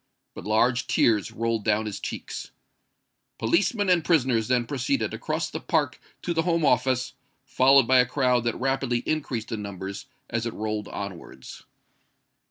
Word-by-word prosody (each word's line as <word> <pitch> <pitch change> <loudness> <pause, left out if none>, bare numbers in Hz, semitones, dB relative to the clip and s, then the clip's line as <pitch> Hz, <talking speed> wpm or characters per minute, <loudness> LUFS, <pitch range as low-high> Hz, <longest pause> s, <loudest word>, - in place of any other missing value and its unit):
But - - -9
large 120 +4 +2
tears 105 -6 +2
rolled 115 -1 -1
down 110 +1 +1
his 105 -2 -5
cheeks! - - -6 0.9
Policemen 200 - +1
and 180 -3 +3
prisoners 130 -10 +2
then 125 -1 +2
proceeded 140 - -1
across - - -2
the - - -4
park - - 0 0.2
to 175 - -1
the 165 - +1
Home 165 -2 +1
Office, 125 0 +1 0.3
followed 135 0 +5
by 130 0 +5
a 125 - +4
crowd 125 -2 +1
that 115 - -1
rapidly 135 -2 0
increased 130 -7 -2
in 110 -2 -3
numbers 100 -1 -6 0.2
as 115 0 -2
it 115 - -5
rolled 105 0 -3
onwards. 85 -10 -8
120 Hz, 155 wpm, -26 LUFS, 110-135 Hz, 0.9 s, followed